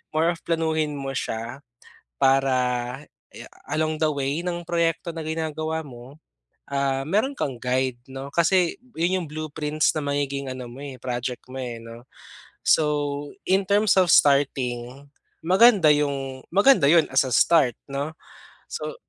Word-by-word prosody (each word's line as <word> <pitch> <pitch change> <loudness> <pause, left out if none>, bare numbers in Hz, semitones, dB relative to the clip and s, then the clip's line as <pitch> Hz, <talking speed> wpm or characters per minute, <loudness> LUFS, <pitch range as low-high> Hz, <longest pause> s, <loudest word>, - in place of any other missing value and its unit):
more 165 +2 +3
of - - -16
planuhin 160 -2 0
mo 135 -1 -4
siya 120 +3 -4 0.6
para 135 0 +4 1.2
along 155 +1 0
the 155 - +3
way 140 +1 -2
ng 175 -1 -3
proyekto 170 0 0
na 165 - -5
ginagawa 160 0 -3
mo, 130 +2 -12 0.5
ah, 140 -1 0
meron 220 - +1
kang 135 -3 -2
guide 130 0 0
no. 135 +1 -7
Kasi 170 +1 +2 0.2
yun 180 +3 +1
yung - - -8
blueprints 155 0 -1
na 155 - -1
magiging 140 -1 -2
ano 130 -1 -7
mo, 125 - -11
eh, 140 -2 -7
project 125 0 -4
mo, 130 - -6
eh, 120 -2 -5
no. 115 +1 -12 0.6
So, 155 - +4 0.6
in 190 +1 +3
terms 205 0 +4
of 180 - +1
starting 135 -2 +2 0.4
maganda 190 -1 +6
yung 135 -3 -2
maganda 200 - +5
yun 165 0 +5
as 135 - +5
a - - -3
start 140 -2 +4
'no. 140 +3 -3 0.6
So, - - -5
145 Hz, 145 wpm, -24 LUFS, 135-165 Hz, 1.2 s, maganda